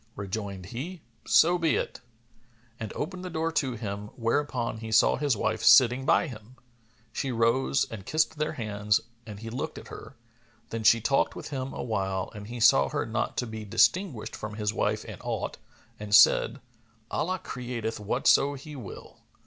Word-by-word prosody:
Rejoined 100 -1 -5
he, 145 - -7 0.2
"So 175 +2 +5
be 165 -3 +2
it," - - -3 0.8
and 110 -2 -5
opened 185 +4 -4
the 185 - -5
door 165 -1 -1
to 135 -5 0
him, 105 -2 -5
whereupon 120 -1 -1
he 110 0 -7
saw 110 - +5
his 140 -5 0
wife 110 +2 -1
sitting 130 +1 +6
by - - +4
him. 120 -3 -10 0.6
She 135 - -2
rose 120 +4 +2
and 110 -4 -7
kissed 155 +5 0
their 155 - -1
hands; 105 -2 0 0.3
and 105 -1 -8
he 115 0 -6
looked 135 +6 -4
at - - -10
her; - - -10 0.6
then 115 0 -3
she 115 +2 +6
talked 135 +5 +1
with - - -7
him 135 -2 -4
awhile 95 -4 -2
and 105 0 -9
he 120 +1 -6
saw 70 -12 +5
her - - -2
not - - -2
to - - 0
be 110 -1 -7
distinguished 120 - +1
from 105 0 -6
his 105 -1 -1
wife - - -1
in - - -9
aught - - -3 0.4
and 105 -1 +1
said, - - +5 0.5
"Allah 185 +3 -1
createth 120 -9 -5
whatso 135 +6 +3
He 145 +2 -9
will." 120 -8 -10
115 Hz, 175 wpm, -28 LUFS, 105-140 Hz, 0.8 s, sitting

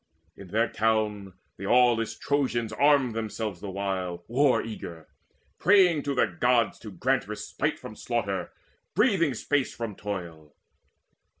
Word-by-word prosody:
In 100 - -11
their 110 +5 +1
town 105 -3 0 0.2
The 95 - -7
aweless 115 -1 +3
Trojans 125 -6 -1
armed 140 -2 +3
themselves 110 -4 -4
the 100 - -5
while 95 -2 -3
War 130 +3 +3
eager, 85 -7 -8 0.5
praying 185 -5 +5
to 140 -1 -2
the - - +4
Gods 115 +3 +1
to 110 - -9
grant 125 +7 0
Respite 105 0 -3
from - - -10
slaughter, - - -2 0.4
breathing 190 - +3
space 140 +3 -1
from 115 -3 -4
toil. 85 -7 -7
115 Hz, 130 wpm, -27 LUFS, 100-130 Hz, 0.5 s, praying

